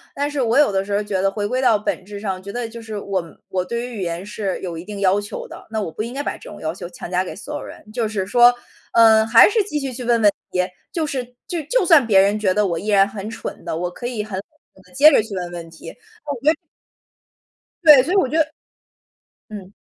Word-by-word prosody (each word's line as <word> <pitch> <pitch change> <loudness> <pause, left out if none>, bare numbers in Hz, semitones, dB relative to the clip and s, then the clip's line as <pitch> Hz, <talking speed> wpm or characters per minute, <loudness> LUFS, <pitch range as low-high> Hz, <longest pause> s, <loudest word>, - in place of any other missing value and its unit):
但 285 +1 -1
是 290 -2 -1
我 235 0 +2
有 290 -7 +5
的 195 0 0
时 205 - -4
候 210 - 0
觉 195 -2 -2
得 195 - +3
回 205 +1 -3
归 255 +5 -1
到 230 -4 +4
本 205 -2 -3
质 205 +1 -8
上， 195 -3 -4
觉 200 - -10
得 240 -2 -3
就 230 0 -9
是 220 -2 -6
我 195 -2 -2 0.3
我 185 -1 -1
对 235 +5 -3
于 240 - -8
语 - - -4
言 170 +1 -4
是 205 -2 -3
有 175 -3 -5
一 165 - -8
定 205 -1 -7
要 195 +1 +3
求 205 0 -6
的， - - -11
那 220 -1 -2
我 180 - -4
不 210 - -5
应 235 +3 -5
该 285 +2 -3
把 - - -3
这 - - -12
种 - - -11
要 160 +1 -2
求 175 - -8
强 175 0 -9
加 185 +1 +1
给 - - -7
所 285 +8 -8
有 290 - -4
人。 - - -11
就 230 0 -1
是 205 -3 -2
说， 240 +4 +6 0.4
呃， 220 -1 +6
还 230 - +8
是 435 0 +2
继 300 -7 -2
续 270 -1 -3
去 250 0 -7
问 235 -1 +2
问 205 - +6 0.2
题， 180 - +1 0.3
就 325 -2 -1
是 265 -4 -3 0.2
就 345 -3 -3
就 395 - +1
算 320 -7 +6
别 195 -3 +6
人 205 +2 +2
觉 195 -3 +2
得 210 +2 +2
我 170 -4 -1
依 205 - -8
然 200 -2 +5
很 200 +1 -7
蠢 225 - -7
的， - - -3
我 175 +2 -3
可 240 - -6
以 230 -4 -3
很 200 -3 -5
好 - - -4 0.4
地 - - -23
接 295 +4 +7
着 245 - +5
去 210 -2 -7
问 180 -1 -4
问 170 -1 -8
题， 165 - -11
我 440 - -18 0.3
觉 305 - +5
得。 - - -2 1.3
对， 295 -5 +9
所 330 +8 -3
以 - - +2
我 380 - +3
觉 310 - -2
得 315 -1 +1 1.0
嗯。 205 -2 -10
215 Hz, 295 characters per minute, -21 LUFS, 195-250 Hz, 1.3 s, 对